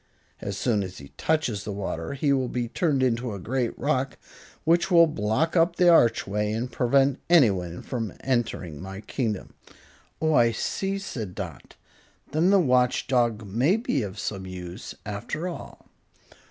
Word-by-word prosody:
As 100 -1 -4
soon 110 -3 +1
as 95 -2 -6
he 70 -1 -11
touches 140 -11 -1
the 105 - -4
water 100 -1 -4
he 140 +1 +1
will 130 -2 +1
be 120 -1 -2
turned 140 +1 +1
into 120 -3 0
a - - -6
great 120 +5 -2
rock, 135 -2 -1 0.5
which 170 +3 +3
will 170 -2 +7
block 150 - 0
up 170 0 +3
the 180 0 +5
archway 105 - +3
and 120 +3 -3
prevent 135 +3 +2
anyone 95 - +3
from 115 -5 -3
entering 110 - -2
my 95 +1 -7
kingdom." 110 -2 -3 0.7
"Oh, 160 0 +2
I 115 -4 +4
see," 195 - -2
said 115 - -6
Dot. - - -7 0.6
"Then 160 +5 +3
the 200 0 +6
Watch 125 -6 +2
Dog 120 -4 +1
may 125 - +2
be 220 - -1
of 100 -1 -5
some 95 -1 -4
use, 90 +2 -7
after 105 - -4
all." 175 - -8
120 Hz, 160 wpm, -26 LUFS, 105-150 Hz, 0.7 s, will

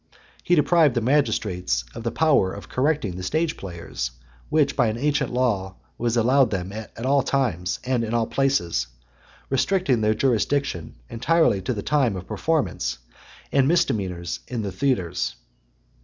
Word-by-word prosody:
He 175 - +3
deprived 155 -3 +4
the 120 - +1
magistrates 95 - +1
of - - -7
the 115 - -1
power 140 -9 +3
of 100 - -9
correcting 130 - 0
the - - -5
stage 155 - 0
players, 85 -9 -5 0.4
which 155 -2 +2
by 120 -4 +3
an 110 +1 -1
ancient 140 0 0
law 105 -7 0 0.2
was 120 0 -1
allowed 125 +2 +4
them 95 -2 -3
at 110 +2 -7
all 140 +1 +4
times, 120 -10 -1
and 125 -2 0
in 110 - -3
all 115 -1 +1
places; 90 - 0 0.6
restricting 135 - +2
their 110 0 +2
jurisdiction 130 - 0
entirely 125 - +2
to 125 - -2
the 100 - -4
time 135 -8 +2
of 90 -1 -6
performance 90 - -1 0.5
and 135 -1 +3
misdemeanours 95 - 0
in 120 -3 -3
the 100 - -3
theatres. 90 -6 -1
120 Hz, 155 wpm, -24 LUFS, 95-140 Hz, 0.6 s, deprived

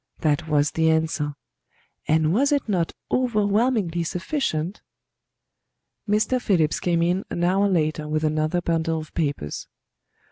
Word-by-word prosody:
That 155 +1 +1
was 150 -1 +2
the 160 0 +2
answer; 160 -2 0 0.7
and 155 +1 +3
was 275 +7 +2
it 285 -4 +1
not 180 -6 0 0.2
overwhelmingly 210 -6 +1
sufficient? 180 - -2 1.3
Mr. 215 +5 +2
Phillips 165 -9 +2
came 170 -1 +1
in 180 +3 +1
an 175 - -2
hour 195 +3 +3
later 155 -4 0
with 155 +1 -1
another 155 +3 0
bundle 165 -1 0
of 155 -2 -8
papers. 145 - -3
170 Hz, 130 wpm, -24 LUFS, 155-200 Hz, 1.3 s, and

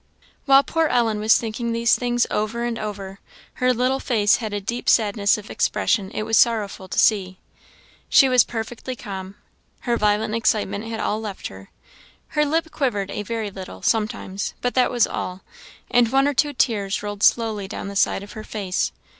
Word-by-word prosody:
While 275 0 +6
poor 325 +3 +1
Ellen 225 -5 +1
was 215 +1 +5
thinking 230 +1 -3
these 230 0 +2
things 240 -1 +1
over 215 +3 -1
and 240 -1 -2
over, 200 -2 -6 0.4
her 255 0 +4
little 255 +2 +1
face 215 -6 +2
had 220 -3 -5
a 205 - -2
deep 240 +6 -3
sadness 205 -3 +3
of 210 0 -10
expression 200 -3 0
it 215 - -4
was 225 0 +3
sorrowful 210 -5 +1
to - - -6
see. 190 -4 +2 0.7
She 270 - +6
was 255 -1 +5
perfectly 235 +3 -5
calm 195 -4 -7 0.5
her 240 -2 0
violent 210 0 +1
excitement 215 -2 0
had 225 -1 -5
all 215 0 -1
left 210 -3 -6
her 95 0 -13 0.6
her 300 - +1
lip 320 +2 -1
quivered 205 -9 -1
a - - -3
very 220 -1 -4
little, 190 -1 -9
sometimes, 210 -3 -1
but 245 - -1
that 255 - +3
was 240 -3 +3
all; 185 +1 -5 0.5
and 240 -2 +4
one 270 +1 +3
or 290 - +1
two 290 +2 +1
tears 210 -6 0
rolled 205 -1 -5
slowly 220 -4 +2
down 200 - -6
the 200 - -7
side 195 - +1
of 200 - -11
her 215 - -8
face. 200 -4 -2
220 Hz, 185 wpm, -22 LUFS, 205-240 Hz, 0.7 s, While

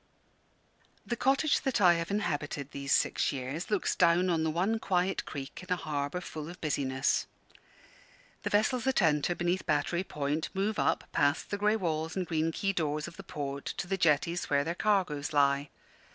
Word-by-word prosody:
The 240 - -2
cottage 275 +5 +2
that 265 -4 0
I 180 -3 +7
have 170 0 -2
inhabited 145 -8 -2
these 140 0 -5
six - - +2
years 140 - -4
looks 210 -3 +1
down 175 +1 +4
on 160 -2 +1
the 160 - +1
one 190 +8 0
quiet 185 -2 0
creek 135 +2 -7
in 185 - -11
a - - +4
harbour 150 +1 -3
full 155 -3 -7
of 175 +1 -10
business. 135 -3 0 1.1
The - - -2
vessels 220 +4 +2
that 265 -6 +2
enter 160 +2 +2
beneath 175 +2 -1
Battery 170 +3 +1
Point 150 -1 -2
move 205 +3 0
up - - +1
past 145 +2 +1
the 205 - 0
grey 210 +1 +3
walls 160 -5 -2
and 185 -2 -1
green 165 -1 0
quay 195 +4 -1
doors 150 -3 -1
of - - -10
the - - -8
port 140 -1 -5
to - - -2
the 195 +2 -1
jetties 170 0 +1
where 140 0 +3
their 165 +3 -2
cargoes 175 -8 0
lie. 140 0 +3
170 Hz, 180 wpm, -30 LUFS, 145-190 Hz, 1.1 s, I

